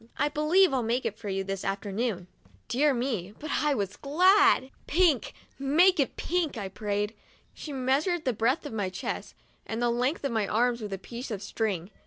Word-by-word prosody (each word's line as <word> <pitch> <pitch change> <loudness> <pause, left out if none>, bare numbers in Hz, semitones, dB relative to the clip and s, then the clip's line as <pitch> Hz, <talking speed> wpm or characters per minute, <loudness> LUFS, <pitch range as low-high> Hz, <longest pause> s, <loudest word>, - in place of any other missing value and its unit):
I 295 - +2
believe 305 +4 +3
I'll 260 - +2
make 235 +3 -1
it 215 +1 -3
for 210 -3 -5
you 195 0 -1
this 195 0 -4
afternoon." 200 0 -2 0.4
Dear 290 +4 +3
me, 235 -7 -2
but 310 - -6
I 295 -2 +2
was 200 -3 -3
glad! 360 -1 +4 0.2
"Pink 325 -6 +2 0.2
— - - -34
make 320 +7 +4
it 275 - +1
pink!' 335 -6 -1
I 200 -3 -4
prayed. 205 +1 -2 0.4
She 305 - -8
measured 285 +6 0
the 255 - +1
breadth 235 +9 +1
of 290 - -6
my 205 -4 -1
chest 185 0 -5 0.3
and 225 - -4
the 240 0 +2
length 250 +7 0
of 275 - -1
my 220 -3 0
arms 240 +2 +1
with 210 -2 -5
a - - -2
piece 240 +7 -8
of 210 -3 -4
string. 200 -3 -2
245 Hz, 200 wpm, -28 LUFS, 205-295 Hz, 0.4 s, glad